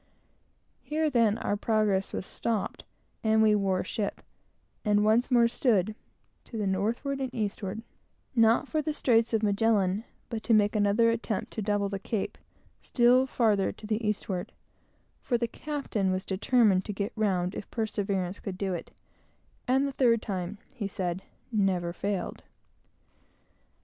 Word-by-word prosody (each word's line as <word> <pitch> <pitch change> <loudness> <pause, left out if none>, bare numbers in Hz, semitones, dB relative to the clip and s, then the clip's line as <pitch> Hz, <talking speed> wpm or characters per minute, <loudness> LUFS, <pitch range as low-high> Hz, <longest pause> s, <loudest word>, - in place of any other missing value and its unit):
Here 310 0 0
then 230 -4 +3
our 205 - -1
progress 205 -3 +1
was - - -4
stopped, 225 0 -3 0.4
and 220 0 +3
we 215 -1 +5
wore 195 -3 +1
ship, 200 +1 -3 0.6
and 210 -1 +3
once 225 +3 +3
more 240 -2 +5
stood 215 -4 +1 0.5
to 230 - -7
the 210 - -1
northward 225 +9 -1
and 260 -2 -2
eastward; 210 -1 -3 0.5
not 230 +3 +4
for 310 +1 0
the 310 0 -2
straits 230 -4 +3
of 225 -1 +1
Magellan, 205 -1 +2 0.2
but 225 -2 -4
to 230 - +3
make 210 0 +3
another 210 +3 +4
attempt 230 -2 -3
to 220 - -3
double 205 -1 0
the 195 0 -4
Cape, 205 +1 -3 0.4
still 250 +1 +4
farther 215 -6 +2
to 215 - -12
the 215 +1 -1
eastward; 195 -3 -2 0.7
for 245 - 0
the 235 0 -1
captain 260 -7 -2
was 185 0 -2
determined 200 -1 +3
to 210 - -4
get 200 +1 -3
round 190 -4 0
if 205 - -7
perseverance 200 -4 -2
could 190 -2 -6
do 195 -1 -1
it; 175 - -5 0.8
and 265 +2 +3
the - - -3
third 240 -4 +3
time, 190 0 -4 0.2
he 225 -6 -3
said, 185 -2 -3 0.3
never 185 -5 +1
failed. 200 +1 -3
215 Hz, 150 wpm, -28 LUFS, 195-230 Hz, 0.8 s, we